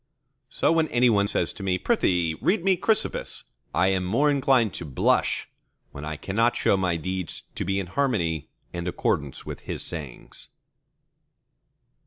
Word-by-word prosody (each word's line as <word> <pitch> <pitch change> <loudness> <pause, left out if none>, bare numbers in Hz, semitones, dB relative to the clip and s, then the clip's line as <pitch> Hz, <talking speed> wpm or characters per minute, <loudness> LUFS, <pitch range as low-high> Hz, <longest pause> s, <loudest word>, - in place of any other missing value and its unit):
So - - +1
when 165 -1 +3
any 120 -2 +3
one 100 -2 +3
says - - +1
to - - -10
me, 95 -2 +1
Prithee, 90 - +1
read 200 -2 +2
me 190 0 +4
Chrysippus, 215 +5 -1 0.3
I 95 - +3
am 95 -1 +1
more 125 +11 +2
inclined 130 -6 +3
to - - -4
blush, 70 -5 +1 0.4
when 70 - -8
I 75 0 -4
cannot 115 +8 +1
show - - +3
my 90 -3 +1
deeds 90 -1 -4
to - - -3
be 95 +1 0
in 95 - -3
harmony 90 - -1 0.2
and 85 0 -4
accordance 70 -5 -1
with - - -6
his - - -5
sayings. 75 -7 -8
95 Hz, 160 wpm, -25 LUFS, 85-125 Hz, 0.4 s, me